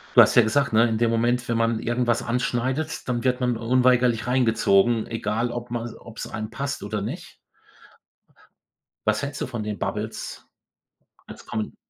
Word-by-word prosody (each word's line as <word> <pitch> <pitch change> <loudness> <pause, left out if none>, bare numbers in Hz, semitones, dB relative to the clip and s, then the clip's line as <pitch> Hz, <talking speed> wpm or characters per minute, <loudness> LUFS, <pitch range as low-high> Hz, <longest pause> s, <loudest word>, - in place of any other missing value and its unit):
Du - - +10
hast - - +3
ja 120 - +9
gesagt, 140 +5 +1
ne? 115 +2 +5
In 110 - 0
dem 115 +1 +2
Moment, 120 +2 +1
wenn 115 - +1
man 115 -1 +1
irgendwas 120 0 0
anschneidet, 125 +6 -2
dann 120 0 -1
wird 125 0 +1
man 125 -2 +1
unweigerlich 125 0 +2
reingezogen, 115 -3 +3
egal 115 +1 -1
ob 120 0 -6
man 120 -1 -3
ob's 115 -1 -8
einem 110 0 -5
passt 135 -1 -4
oder 105 +1 -3
nicht. 135 - -6 1.7
Was 110 +3 +2
hältst 140 -1 -4
du - - -1
von 115 -3 -5
den 105 -2 -4
Bubbles? - - -5 0.8
Als - - -12
kommen 110 0 -4
120 Hz, 165 wpm, -24 LUFS, 110-125 Hz, 1.7 s, Du